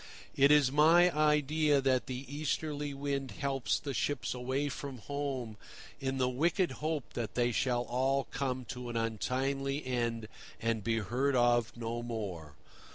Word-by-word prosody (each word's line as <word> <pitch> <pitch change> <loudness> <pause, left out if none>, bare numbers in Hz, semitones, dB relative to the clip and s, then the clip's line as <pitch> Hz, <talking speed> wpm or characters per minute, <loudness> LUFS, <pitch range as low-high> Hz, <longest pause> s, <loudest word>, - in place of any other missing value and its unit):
It 140 +1 +5
is 145 -3 +5
my 165 +4 +5
idea 150 -1 +3
that 130 -2 +1
the 130 +1 -5
Easterly 145 +1 -2
Wind 140 -1 -2
helps 135 +3 -1
the 140 -2 -4
ships 130 +4 -1
away 130 +3 -1
from 140 -1 -5
home 130 -3 -4 0.4
in 135 0 -2
the 130 -1 +2
wicked 170 +8 +1
hope 155 -3 -2
that 115 -4 -4
they 120 0 +2
shall 120 +1 +1
all 135 +3 +1
come 130 -2 -2
to 125 -1 -5
an 115 - -2
untimely 135 +5 -1
end 115 -3 -1 0.3
and 115 -1 -1
be 115 +1 +1
heard 125 +7 0
of 120 -2 +3
no 115 0 -3
more. 95 - -5
130 Hz, 155 wpm, -32 LUFS, 120-145 Hz, 0.4 s, It